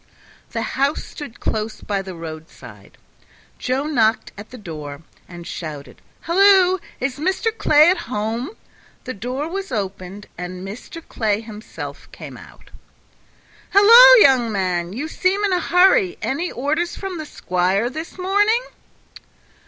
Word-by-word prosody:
The 230 -1 -3
house 275 +6 -1
stood 285 -6 -10
close 220 0 -3
by 200 -2 -2
the 190 -2 -8
roadside. 155 -10 -11 0.6
Joe 260 +2 -1
knocked 230 -7 +1
at 205 +2 -11
the 255 - -10
door, 155 -7 -8 0.2
and 175 -1 -10
shouted, 155 -5 -8 0.2
"Halloo! 375 +1 +4 0.2
Is 255 +2 -3
Mr. 380 +7 -1
Clay 305 -4 +5
at 370 - 0
home?" 230 - -3 0.5
The 255 - -5
door 250 +8 -4
was 390 +1 -5
opened, 195 -2 -5
and 180 +1 -6
Mr. 250 +10 -10
Clay 215 -2 -1
himself 220 -1 -9
came - - -10
out. - - -16 1.0
"Halloo, 470 +5 +9
young 255 - +4
man! 180 -3 -1
You 265 +10 -4
seem 375 +5 0
in 400 -2 +1
a 360 - +2
hurry; 360 +2 +3
any 335 +7 -2
orders 310 +7 -2
from 380 -4 -6
the 310 - -5
squire 185 +3 0
this 315 +8 -7
morning?" 410 +6 +2
250 Hz, 135 wpm, -20 LUFS, -, 1.0 s, Halloo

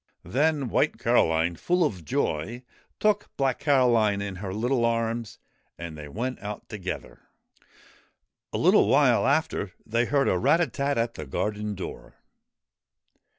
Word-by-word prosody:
Then 145 +1 +1
White - - +1
Caroline, 80 +1 +2
full 180 0 +1
of 95 - -3
joy, 95 - -2 0.4
took 210 -1 +1
Black 135 -2 0
Caroline 120 -8 +3
in 100 -2 -4
her 95 0 -5
little 120 +5 0
arms 115 -1 -1 0.4
and 85 -2 -7
they 75 -1 -8
went 120 - -4
out 105 +1 -7
together. 95 -5 -6 1.3
A - - -2
little - - +5
while - - +4
after - - 0
they 115 +2 +1
heard 140 +2 +1
a 90 - +2
rat 165 - +4
a 175 - +3
tat 140 +1 -2
at 115 0 0
the 75 - -8
garden 105 +7 -2
door. 95 - -8
115 Hz, 145 wpm, -26 LUFS, 95-130 Hz, 1.3 s, little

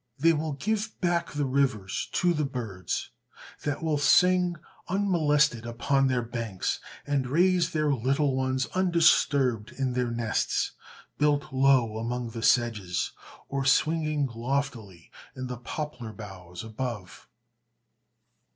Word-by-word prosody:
They 165 +4 +4
will 155 -1 -2
give 215 +8 -2
back 175 -2 0
the 145 -1 0
rivers 130 -8 0
to 175 -1 +2
the 155 -2 0
birds, 110 - -4 0.5
that 145 +2 -3
will 155 -2 +1
sing 180 +3 +4 0.3
unmolested 150 - +2
upon 135 +4 +1
their 125 -2 +1
banks, 115 -5 -3 0.3
and 140 -3 0
raise 175 +4 +3
their 155 -2 +1
little 135 +3 +1
ones 130 0 0
undisturbed 150 - +3
in 130 -2 -2
their 125 -1 0
nests, 115 -2 0 0.5
built 145 -2 +1
low 130 -5 +3
among 120 +1 -3
the 115 0 -6
sedges, 110 -8 +1 0.4
or 140 0 -2
swinging 155 +1 +2
loftily 115 - -4 0.2
in 130 - -5
the 125 -1 -5
poplar 120 -2 -6
boughs 95 -4 -9
above. 110 -4 -6
135 Hz, 125 wpm, -27 LUFS, 115-150 Hz, 0.5 s, They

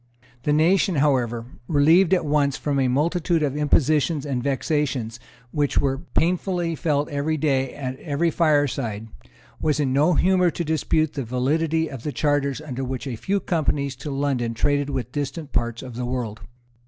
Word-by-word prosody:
The 150 - 0
nation, 170 +4 +3
however, 125 -5 +1 0.2
relieved 165 +5 +4
at 180 -4 +3
once 145 -2 +1
from 145 -2 -1
a 130 - +2
multitude 165 +5 +1
of 140 -2 -1
impositions 150 0 +2
and 135 -4 -2
vexations 135 -4 -1 0.3
which 145 -2 0
were 135 -1 +1
painfully 175 +1 0
felt 150 -2 0
every 145 +2 -1
day 135 -4 0
at 130 -2 -5
every 165 +2 0
fireside, 140 -10 0 0.5
was 150 -1 +1
in 135 -3 +1
no 155 +5 +3
humour 180 0 +3
to 170 - -3
dispute 155 -1 0
the 140 - -3
validity 155 +7 0
of 135 -5 -8
the 150 - -3
charters 145 -2 0
under 135 -4 -5
which 130 0 -4
a 130 -4 -4
few 190 - -1
companies 145 -6 -1
to 150 - -6
London 135 -4 -1
traded 145 +3 +1
with 130 -4 -3
distant 145 +2 -4
parts 120 0 -1
of 130 -2 -8
the 125 +1 -4
world. 120 -4 -4
145 Hz, 165 wpm, -23 LUFS, 130-155 Hz, 0.5 s, relieved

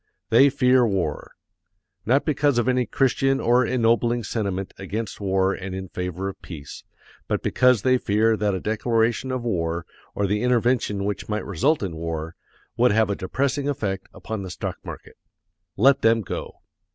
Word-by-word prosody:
They 135 +5 +7
fear 125 -1 +4
war! 95 -9 -2 0.7
Not 135 +4 +3
because 145 -3 +2
of 120 - +1
any 125 -1 +2
Christian 135 +1 +1
or 120 +2 +3
ennobling 120 -1 +2
sentiment 100 -3 -3
against 105 +3 -5
war 95 -1 +1
and 95 0 -6
in 95 -1 -6
favor 90 +2 -4
of 95 - -7
peace, 75 -6 -9 0.4
but - - -1
because 125 -5 +3
they 130 -1 +3
fear 110 +2 +2
that 105 -2 0
a - - -2
declaration 115 +3 0
of 130 -2 -2
war, 85 -7 -2 0.3
or 100 - 0
the 105 +2 0
intervention 120 -4 +1
which 105 +1 -4
might 105 -2 -2
result 110 - +1
in 90 -4 -3
war, 80 0 -4 0.4
would 125 0 +4
have 110 -1 +2
a - - 0
depressing 140 +9 -1
effect 100 -8 -3
upon 110 -2 -6
the 95 - -6
stock 90 - -5
market. - - -10 0.6
Let 135 +6 +5
them 115 0 +4
go. - - -6
110 Hz, 165 wpm, -24 LUFS, 95-125 Hz, 0.7 s, They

